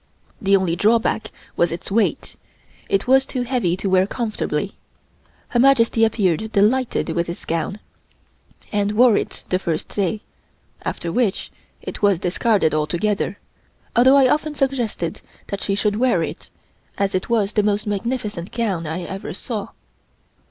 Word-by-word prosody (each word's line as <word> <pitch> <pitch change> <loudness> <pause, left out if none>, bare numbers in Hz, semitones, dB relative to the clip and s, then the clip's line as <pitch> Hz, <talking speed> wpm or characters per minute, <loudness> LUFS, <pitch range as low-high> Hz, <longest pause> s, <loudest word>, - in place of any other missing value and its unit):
The 195 0 +4
only 180 -3 0
drawback 220 +3 +2 0.3
was 170 - +2
its 170 +3 -6
weight; 220 +1 0 0.5
it 400 -2 +1
was 265 +1 +5
too 255 -2 -3
heavy 235 -9 0
to 195 - -3
wear 190 0 +3
comfortably. 225 -1 -2 0.8
Her 240 - +1
Majesty 235 -3 +4
appeared 215 -2 +1
delighted 235 +5 +2
with 170 0 -1
this 170 - -6
gown, 165 +4 -2 0.9
and 205 0 0
wore 235 0 +6
it - - -3
the 185 - +1
first 165 -4 -2
day, 205 +1 -1 0.6
after 170 - -4
which 215 0 0 0.3
it - - -7
was 200 -3 +4
discarded 180 -1 +1
altogether, 170 +7 0 0.6
although 260 +3 +6
I 270 -2 +6
often 300 +2 0
suggested 245 - -1 0.3
that 200 - -4
she 195 - 0
should 205 0 0
wear 235 -8 +2
it, - - -6 0.5
as 200 -1 0
it 185 - -2
was 215 -4 +1
the 210 - +3
most 205 0 0
magnificent 210 -3 -3
gown 195 -9 -1
I 165 +3 -3
ever 195 0 -6
saw. 210 -2 -4
205 Hz, 150 wpm, -21 LUFS, 185-235 Hz, 0.9 s, wore